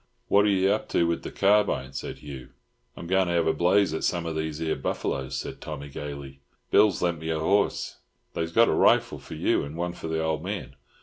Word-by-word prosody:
"What 100 +1 +5
are - - +3
you 95 0 +3
up 105 - -1
to 85 - +2
with 85 0 0
the - - -6
carbine?" 100 -9 +2
said 65 - -5
Hugh. 70 -4 -9 0.5
"I'm - - -7
going 95 +1 +2
to 85 - 0
have 85 - +2
a 80 - +3
blaze 95 0 +3
at 80 - -3
some 85 -2 0
of 80 -1 -3
these 80 -1 -3
'ere 80 -1 -1
buff'loes," 65 0 -3
said - - -6
Tommy 70 -2 -6
gaily. 70 -1 -7 0.3
"Bill's 105 -5 +4
lent 85 -2 0
me 80 +1 -5
a 80 -1 0
horse. 100 +6 +1 0.4
They's 85 0 -2
got 115 +5 +5
a - - +2
rifle - - +3
for - - -9
you, - - +1
and 70 +3 -7
one 85 0 -2
for 85 - -7
the 80 0 -1
old 80 -1 -1
man. 100 +2 -5
80 Hz, 230 wpm, -26 LUFS, 75-95 Hz, 0.5 s, What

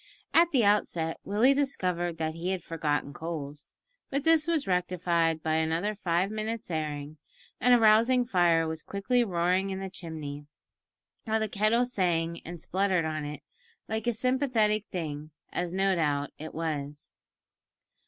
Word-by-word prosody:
At 335 +1 +6
the 255 -9 +3
outset 175 -5 +1
Willie 225 +7 +4
discovered 180 - -1
that 160 0 -2
he 170 +3 -4
had 190 -3 -2
forgotten 150 -3 -2
coals, 150 -2 -6 0.3
but 275 0 -1
this 325 0 +4
was 325 -4 +1
rectified 175 -3 +1
by 160 0 +1
another 165 +6 0
five 185 -1 0
minutes' 220 -1 -4
airing, 150 -1 -4 0.4
and 250 0 +6
a - - +4
rousing 230 +3 +5
fire 170 -6 +3
was 160 0 -4
quickly 240 +8 0
roaring 185 -1 +1
in 190 0 -3
the 195 -1 -5
chimney, 150 -5 -7 0.8
while 220 -1 +1
the 220 - 0
kettle 215 +4 +2
sang 170 -7 -1
and 175 +1 -7
spluttered 185 0 +1
on 155 -1 -3
it 145 -1 -7 0.4
like 220 +1 -3
a 240 - +3
sympathetic 225 -4 +1
thing, 155 -4 -5 0.2
as 175 -1 -2
no 195 +1 +2
doubt 145 -4 0
it 155 +1 -7
was. 150 -3 -4
180 Hz, 155 wpm, -28 LUFS, 160-215 Hz, 0.8 s, At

